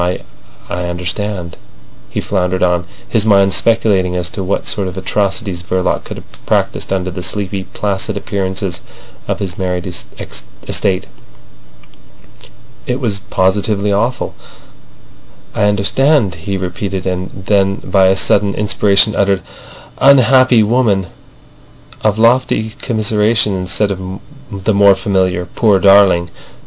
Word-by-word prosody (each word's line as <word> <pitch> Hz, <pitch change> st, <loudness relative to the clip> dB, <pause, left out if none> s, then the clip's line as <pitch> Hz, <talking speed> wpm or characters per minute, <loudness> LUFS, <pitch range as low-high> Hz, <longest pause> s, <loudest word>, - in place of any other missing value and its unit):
I—I 90 Hz, 0 st, -5 dB
understand," 90 Hz, +1 st, -4 dB, 0.5 s
he -, -, -3 dB
floundered 90 Hz, -1 st, -1 dB
on, 90 Hz, -1 st, +1 dB, 0.2 s
his 110 Hz, -3 st, +1 dB
mind 100 Hz, -3 st, +4 dB
speculating 100 Hz, -4 st, +2 dB
as 90 Hz, 0 st, -2 dB
to 95 Hz, -, -4 dB
what 95 Hz, -, -2 dB
sort 100 Hz, -2 st, -1 dB
of 90 Hz, 0 st, -7 dB
atrocities 100 Hz, -1 st, -2 dB
Verloc 90 Hz, 0 st, -1 dB
could -, -, -7 dB
have -, -, -14 dB
practised -, -, 0 dB
under 95 Hz, -1 st, -1 dB
the 90 Hz, -, -6 dB
sleepy, 95 Hz, +1 st, -2 dB
placid 100 Hz, -1 st, -2 dB
appearances 95 Hz, -3 st, -3 dB, 0.5 s
of -, -, -1 dB
his 95 Hz, -1 st, -4 dB
married 90 Hz, -2 st, -2 dB
estate. 90 Hz, +2 st, -4 dB, 1.8 s
It 125 Hz, +1 st, -1 dB
was 110 Hz, -6 st, -1 dB
positively 100 Hz, +1 st, 0 dB
awful. 115 Hz, +5 st, -1 dB, 1.2 s
"I 105 Hz, -, +1 dB
understand," 105 Hz, -, +2 dB
he 95 Hz, +3 st, -4 dB
repeated, 95 Hz, +1 st, -4 dB
and 95 Hz, 0 st, -2 dB, 0.2 s
then 100 Hz, -1 st, +2 dB
by 95 Hz, -1 st, +2 dB
a 95 Hz, -, +3 dB
sudden 100 Hz, +1 st, +2 dB
inspiration 105 Hz, 0 st, +3 dB
uttered 100 Hz, -1 st, +1 dB, 0.6 s
an—"Unhappy 130 Hz, -3 st, +5 dB
woman!" 105 Hz, -5 st, +1 dB, 0.9 s
of 110 Hz, -1 st, +2 dB
lofty 115 Hz, -1 st, +2 dB
commiseration 110 Hz, -2 st, +1 dB
instead 95 Hz, +3 st, 0 dB
of 95 Hz, 0 st, -5 dB, 0.3 s
the 100 Hz, +2 st, -1 dB
more 100 Hz, -1 st, +6 dB
familiar 95 Hz, -2 st, 0 dB
"Poor 105 Hz, +3 st, +2 dB
darling!" 95 Hz, -3 st, +5 dB
100 Hz, 120 wpm, -15 LUFS, 95-105 Hz, 1.8 s, more